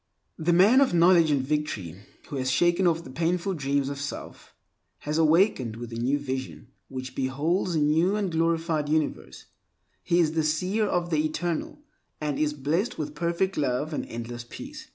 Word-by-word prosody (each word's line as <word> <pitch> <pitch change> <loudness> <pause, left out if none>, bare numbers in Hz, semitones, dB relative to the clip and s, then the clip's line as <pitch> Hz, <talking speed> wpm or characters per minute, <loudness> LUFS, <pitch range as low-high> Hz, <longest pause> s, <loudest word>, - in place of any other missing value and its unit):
The 160 +2 +1
man 200 +10 +6
of 260 -10 +3
knowledge 170 -1 +5
and 140 -3 +2
victory, 130 - -2 0.3
who 140 - -5
has 130 0 -1
shaken 175 +7 +3
off 165 0 +1
the 130 - -10
painful 170 +6 0
dreams 140 -3 0
of 140 0 -5
self, 140 - -7 0.5
has 150 +2 -1
awakened 160 - +3
with 120 0 -8
a 115 - -4
new 130 +4 +1
vision 130 -4 -5 0.2
which 130 -1 -6
beholds 150 +8 0
a - - +2
new 160 +6 +3
and 200 -4 -1
glorified 165 -2 0
universe, 155 0 -2 0.6
He 170 - +1
is 160 -3 +3
the 160 0 0
seer 180 +8 0
of 175 -3 -1
the 155 -1 +2
Eternal, 165 - -3 0.4
and 150 -2 -2
is 150 -1 0
blessed 155 - -1
with 150 - -4
perfect 175 +3 -1
love 145 +2 -1
and - - -2
endless 120 +1 -6
peace. 300 +2 -9
155 Hz, 175 wpm, -26 LUFS, 140-175 Hz, 0.6 s, man